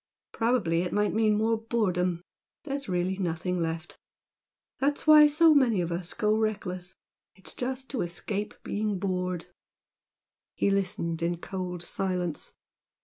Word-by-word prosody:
Probably 225 -8 +1
it 180 - -2
might 210 0 +1
mean 215 -1 +3
more 225 +1 +2
boredom. 185 -6 0 0.4
There's 275 -5 -4
really 180 +1 0
nothing 180 0 -1
left. 165 0 -4 0.8
That's 285 +2 0
why 305 -1 +9
so 315 +2 +5
many 250 -8 +4
of 170 -1 -1
us 170 +1 -4
go 215 0 +2
reckless 200 -5 -2 0.4
it's 190 - -6
just 260 +1 -4
to 265 - -1
escape 195 +4 -3
being 210 -1 -1
bored." 180 -2 -2 1.1
He 200 - +2
listened 175 -4 -1
in 170 +1 0
cold 180 -1 -5
silence. 180 -6 -2
190 Hz, 135 wpm, -28 LUFS, 175-225 Hz, 1.1 s, why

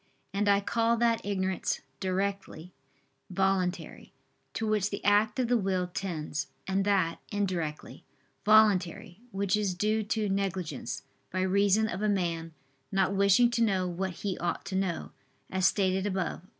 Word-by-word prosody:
And 205 +1 +1
I 200 0 +4
call 230 +3 +1
that 230 -1 +2
ignorance 190 -2 -1 0.2
"directly" 190 -2 -3 0.6
voluntary, 190 -1 -1 0.4
to 225 - -1
which 210 -2 +1
the 200 - -6
act 210 +1 +3
of 255 -2 +1
the 245 0 +3
will 190 -2 0
tends: 170 -4 -4 0.2
and 195 +1 0
that, 190 -5 +1
"indirectly" 180 -7 -3 0.4
voluntary, 200 -3 +3
which 195 -2 0
is 205 -3 0
due 215 +3 +1
to 215 0 -1
negligence, 190 -3 -3 0.3
by 185 - -2
reason 200 +3 +3
of 190 -1 -4
a 215 - +1
man 170 -4 -1 0.4
not 195 0 +2
wishing 200 +5 +4
to 235 - 0
know 190 -4 +1
what 180 +1 -4
he 195 -2 -1
ought 175 - -2
to 190 - -4
know, 190 -3 -2 0.4
as 190 0 +3
stated 190 0 +1
above 190 -3 -2
(Q. 185 - -23
195 Hz, 150 wpm, -29 LUFS, 185-205 Hz, 0.6 s, I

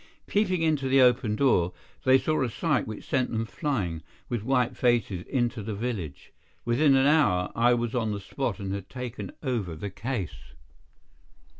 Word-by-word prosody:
Peeping 185 -5 +1
into 150 -4 +1
the 135 +1 +5
open 125 -4 +4
door, 90 -10 +2 0.3
they 130 0 +7
saw 155 +3 0
a 130 - +1
sight 150 +3 0
which 110 -1 -7
sent 130 -4 +1
them 115 0 -1
flying, 105 - -2 0.3
with 120 -3 -2
white 125 +1 +1
faces, 120 -7 +1
into 120 -3 -1
the 105 0 -4
village. 100 - -5 0.3
Within 135 +4 +4
an 135 0 +4
hour, 140 - +3
I 120 +1 +4
was 120 -1 -2
on 115 -4 0
the 100 - -3
spot 115 0 -3
and 95 -1 -3
had 100 -2 -6
taken 125 -6 -6
over 115 - -2
the 100 +5 -6
case. 95 - -5
120 Hz, 170 wpm, -27 LUFS, 100-135 Hz, 0.3 s, they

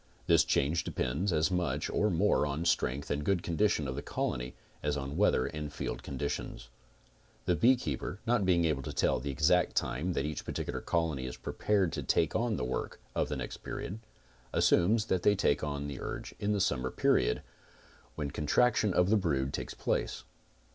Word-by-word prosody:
This - - +5
change 80 +5 +1
depends 80 +11 -1
as 80 +2 +2
much 90 -1 0
or 105 - +1
more 95 0 +3
on 75 +4 -3
strength 70 -4 0
and 75 +1 -1
good 90 +1 +1
condition 85 -3 +1
of 65 - -2
the 70 - -3
colony - - -3 0.3
as 75 0 0
on 70 +1 -4
weather 95 -9 +3
and 75 -1 -5
field - - -4
con 70 - -6
ditions. 65 -2 -4 0.8
The 90 0 +2
beekeeper, 100 - +1
not 120 -3 +2
being 90 -2 +3
able 75 -4 +1
to - - -6
tell - - +2
the 70 +3 -5
exact 80 +6 +2
time 85 +8 0
that 70 - -1
each 75 -1 -4
particular - - -4
colony 80 -6 -1
is 65 - -6
prepared 100 -5 0
to - - -2
take 80 - +1
on 115 -1 +1
the 60 - -2
work 65 - -3
of - - 0
the - - -2
next - - -5
period, 100 +5 -6 0.5
assumes 105 +5 +3
that 95 -4 0
they 105 +2 +4
take 75 -7 +1
on 70 -1 -2
the 70 -2 -6
urge - - -5
in 100 - 0
the 105 - +1
summer 65 -6 +1
period - - +2 0.7
when 75 -2 -3
contraction 105 +6 +2
of 90 +2 +3
the 110 - +6
brood 70 -8 0
takes - - -4
place. - - -1
80 Hz, 190 wpm, -31 LUFS, 70-95 Hz, 0.8 s, the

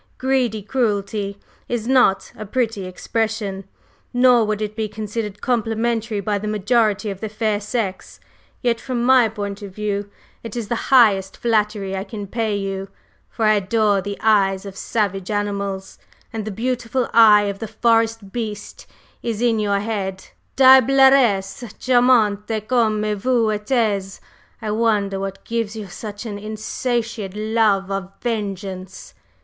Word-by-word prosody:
'Greedy 255 -5 0
cruelty' 205 -4 -1 0.3
is 235 -2 -2
not 250 -7 +3
a - - -7
pretty 220 -2 -1
expression, 205 0 -3 0.5
nor 245 -1 +5
would 215 -1 -1
it 215 0 -4
be 220 -1 -2
considered 210 -1 -5
complimentary 225 -2 0
by 205 +1 -1
the 215 - -5
majority 210 0 +1
of 195 - -8
the 220 - -3
fair 215 -1 -1
sex. 205 -3 -4 0.4
Yet, 235 -2 +1
from 250 -3 -2
my 255 -3 +5
point 205 -1 -5
of 195 -2 -9
view, 205 -1 -2 0.3
it 230 -1 -8
is 230 -3 -4
the 235 - -3
highest 210 -8 +4
flattery 210 -4 0
I 190 - -3
can 210 -1 -7
pay 220 +1 -2
you, 195 -1 -4 0.4
for 225 - -2
I 215 - +5
adore 205 0 +2
the 200 +1 -5
eyes 195 -3 +2
of 195 -1 -8
savage 195 -3 -2
animals, 200 -2 -3 0.3
and 220 -2 -4
the - - -3
beautiful 245 +3 -2
eye 215 -2 +7
of 200 -1 -3
the 225 - -4
forest 225 -3 +1
beast 215 -3 -6 0.3
is 230 -3 -3
in 235 -2 +2
your 200 -1 +1
head, 195 -3 -4 0.3
diableresse 265 -5 +5
charmante 225 -4 +2
comme 220 -4 +2
vous 230 0 +1
êtes! 210 -3 -1 0.4
I 215 - -2
wonder 210 -3 +1
what 195 0 -6
gives 230 -2 -2
you 215 -2 -6
such 205 +3 -7
an 205 -2 -5
insatiate 220 -1 -3
love 215 -3 +1
of 195 -1 -3
vengeance?" 195 -5 -5
215 Hz, 145 wpm, -21 LUFS, 200-230 Hz, 0.5 s, eye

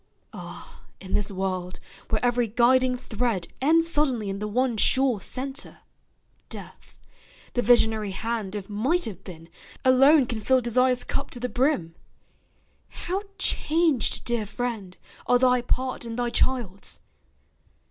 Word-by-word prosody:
Ah, - - -10 0.2
in 190 - -8
this 205 - +1
world, 185 -2 -3 0.3
where 220 +2 0
every 245 -1 +2
guiding 250 +3 +3
thread 225 -6 -2
Ends 330 +4 +4
suddenly 260 -11 0
in 195 - -5
the 210 - -3
one 245 +3 0
sure 255 0 +2
centre, 270 +7 -5 0.7
death, - - -10 0.6
The 245 - +1
visionary 220 -3 +3
hand 215 0 -3
of 200 -2 -5
Might 260 +13 0
have 195 -4 -7
been 165 -3 -11 0.4
Alone 270 +3 +6
can 230 -3 -4
fill 260 +4 +3
Desire's 250 +1 +2
cup - - -3
to 245 - -7
the 250 +1 -2
brim! 245 - 0 1.0
How 375 +3 -3 0.2
changed, 320 -6 +1
dear 235 -3 -1
friend, 215 -4 -4 0.3
are 245 - +5
thy 250 0 +3
part 255 +1 -1
and 230 0 -6
thy 240 -1 -1
child's! 235 -9 -1
240 Hz, 135 wpm, -25 LUFS, 210-260 Hz, 1.0 s, Alone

